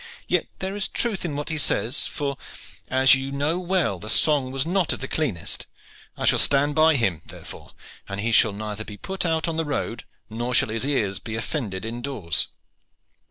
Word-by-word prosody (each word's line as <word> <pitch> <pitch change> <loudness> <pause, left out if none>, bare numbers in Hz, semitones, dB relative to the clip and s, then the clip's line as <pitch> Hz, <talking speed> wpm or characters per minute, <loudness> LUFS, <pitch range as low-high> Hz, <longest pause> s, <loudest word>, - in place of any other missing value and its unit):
Yet - - +1
there 190 +1 -4
is 205 - -1
truth 220 -5 0
in 150 -4 -3
what 145 +2 -4
he 160 -1 -1
says, 120 -3 +2
for, 140 -1 -3 0.5
as 130 +1 +5
you 135 0 0
know 145 +5 -1
well, 180 - 0
the 105 - -7
song 135 +3 +4
was 135 +2 -1
not 180 0 +1
of - - -6
the 135 - -5
cleanest. 130 - -2 0.5
I - - -2
shall - - +5
stand 145 +1 +4
by 155 +1 +4
him, 95 - 0
therefore, - - -11 0.4
and 100 +1 -4
he 115 +3 -1
shall 110 0 +5
neither 105 +1 -5
be 105 -1 -9
put 190 - -3
out 160 +1 0
on 165 -1 -2
the 165 - +1
road, 145 -2 -3 0.2
nor 120 +3 -2
shall - - +4
his 115 +5 0
ears 105 -9 0
be 110 - -6
offended 110 -5 -3
indoors." 115 - -1
135 Hz, 195 wpm, -24 LUFS, 110-160 Hz, 0.5 s, as